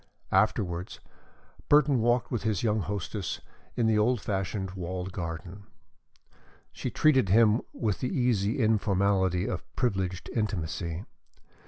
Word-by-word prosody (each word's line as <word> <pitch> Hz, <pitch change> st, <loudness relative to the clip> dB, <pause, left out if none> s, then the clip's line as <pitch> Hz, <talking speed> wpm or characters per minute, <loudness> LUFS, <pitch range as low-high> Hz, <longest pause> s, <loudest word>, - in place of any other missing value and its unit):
Afterwards, 95 Hz, -3 st, 0 dB, 0.7 s
Burton 145 Hz, -3 st, +5 dB
walked 120 Hz, +1 st, +1 dB
with 120 Hz, -, -1 dB
his 110 Hz, -5 st, -1 dB
young 110 Hz, -1 st, +2 dB
hostess 100 Hz, -1 st, -3 dB, 0.4 s
in 120 Hz, -, +1 dB
the 110 Hz, -1 st, +3 dB
old 120 Hz, +3 st, +2 dB
fashioned 95 Hz, -1 st, -2 dB
walled 90 Hz, 0 st, -5 dB
garden. 90 Hz, +3 st, -6 dB, 1.0 s
She -, -, -4 dB
treated 135 Hz, -10 st, +3 dB
him 110 Hz, +2 st, +5 dB
with 105 Hz, -5 st, -2 dB
the 125 Hz, -, -1 dB
easy 120 Hz, -, +1 dB
informality 100 Hz, -4 st, +2 dB
of -, -, -2 dB
privileged 95 Hz, -7 st, -1 dB
intimacy. 90 Hz, -4 st, -2 dB
100 Hz, 120 wpm, -28 LUFS, 95-115 Hz, 1.0 s, Burton